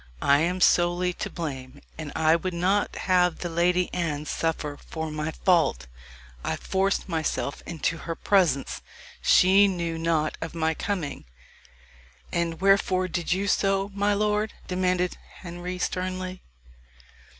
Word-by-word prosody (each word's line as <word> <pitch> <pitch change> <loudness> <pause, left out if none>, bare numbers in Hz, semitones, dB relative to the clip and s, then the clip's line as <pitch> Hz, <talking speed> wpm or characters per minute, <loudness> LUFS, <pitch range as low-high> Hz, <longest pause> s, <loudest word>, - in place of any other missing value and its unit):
"I 140 - +4
am 180 +4 0
solely 175 +1 +3
to - - -5
blame, 135 -4 -6 0.2
and 155 -2 -6
I 160 0 +4
would 180 +1 -3
not 190 +4 +1
have 180 -2 +3
the 175 - -4
Lady 180 +2 +2
Anne 155 -4 -2
suffer 155 -2 -2
for 160 -1 -4
my 155 +1 -3
fault. 160 - +2 0.6
I - - -1
forced 195 +1 0
myself 160 -4 -2
into 165 0 -2
her 165 +1 -4
presence. 170 -10 +1 0.4
She 195 +2 +6
knew 170 -3 -2
not 160 -2 0
of 165 +1 -5
my 160 -1 +1
coming." 160 - -4 1.1
"And 170 -1 -1
wherefore 190 -1 +3
did 175 0 -2
you 195 +2 +1
so, 195 0 +1
my 205 +1 +1
lord?" 210 +1 0
demanded 180 -1 0 0.2
Henry 175 +1 -5
sternly. 185 0 -3
175 Hz, 135 wpm, -26 LUFS, 160-185 Hz, 1.1 s, She